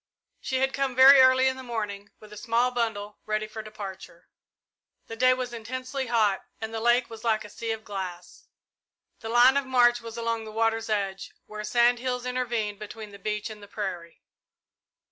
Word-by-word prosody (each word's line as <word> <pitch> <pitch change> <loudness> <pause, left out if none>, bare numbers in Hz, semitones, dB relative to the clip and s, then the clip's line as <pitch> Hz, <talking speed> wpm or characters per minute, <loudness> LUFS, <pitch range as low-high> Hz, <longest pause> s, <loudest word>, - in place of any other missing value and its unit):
She 260 -1 -2
had 265 0 +1
come 275 -2 -1
very 265 +2 +9
early 260 0 +5
in 260 0 0
the - - -7
morning, 210 -4 -5
with 210 -1 -14
a - - -9
small 230 +4 +1
bundle, 220 -4 -3
ready 215 0 -1
for 215 +1 -7
departure. 195 -5 -10 0.8
The 225 - -8
day 255 +2 +4
was 250 -1 -4
intensely 255 +3 -5
hot, 215 -4 +2 0.2
and 220 0 -5
the 225 - -2
lake 240 +2 +3
was 225 0 -11
like 220 -2 +1
a - - -10
sea 230 - -6
of 220 -1 -3
glass. 185 -3 -7 0.7
The 225 - -7
line 245 +3 +6
of 280 -2 -1
march 240 -2 +4
was 230 0 -8
along 230 -1 -2
the 215 - -8
water's 225 0 0
edge, 195 -2 -2
where 210 0 -7
sand 240 +3 +3
hills 250 0 -3
intervened 235 -5 -2
between 215 0 -8
the 200 - -12
beach 210 +2 -3
and 210 -1 -11
the 205 - -12
prairie. 190 -5 -6
225 Hz, 190 wpm, -27 LUFS, 210-250 Hz, 0.8 s, very